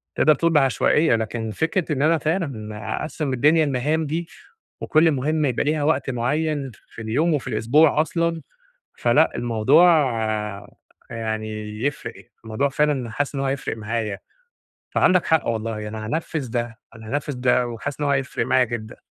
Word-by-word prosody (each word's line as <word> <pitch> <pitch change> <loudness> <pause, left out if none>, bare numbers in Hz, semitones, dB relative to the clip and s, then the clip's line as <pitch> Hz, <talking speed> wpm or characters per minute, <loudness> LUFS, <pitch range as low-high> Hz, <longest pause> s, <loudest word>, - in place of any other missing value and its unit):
تقدَر 155 - +5
تقول 170 +4 +1
بعشوائية، 145 0 +3
لكن 110 0 -3
فكرة 160 - -1
إن 140 - -2
أنا 160 +3 +4
فعلًا 140 - -3 0.2
أقسِّم 155 -3 -3
الدنيا 150 +5 +4
لمهام 150 +4 0
دي 165 +3 -3 0.5
وكل 160 +1 +3
مهمة 150 +2 0
يبقى 125 - 0
ليها 150 0 0
وقت 145 -3 +1
معين 140 +3 -1
ف - - -18 0.2
في - - -7
اليوم، 140 +10 +1
وفي 145 - -2
الأسبوع 150 +6 +3
أصلًا، 165 0 -1 0.6
فلأ 145 +7 +3
الموضوع 120 +8 +4 1.2
يعني 110 -1 -5
يفرِق، 145 - -4 0.2
الموضوع 110 +5 -1
فعلًا 140 -3 0
حاسس 145 +5 -2
إن 135 - -2
هو - - -1
هيفرِق 135 -4 -3
معايا. 110 -2 -3 0.7
فعندك 185 -2 +3
حق 160 -1 +2
والله، 110 -2 -3
أنا 110 0 -6
هانفِّذ 150 -1 -3
ده، 120 -1 -3 0.2
أنا 110 -1 -12
هانفِّذ 145 0 -2
ده 125 0 +3
وحاسس 125 +5 -6
إن 145 - 0
هو - - +1
هيفرق 135 -1 -1
معايا 130 -1 +4
جدًا. 115 -2 -6
135 Hz, 155 wpm, -22 LUFS, 115-155 Hz, 1.2 s, تقدَر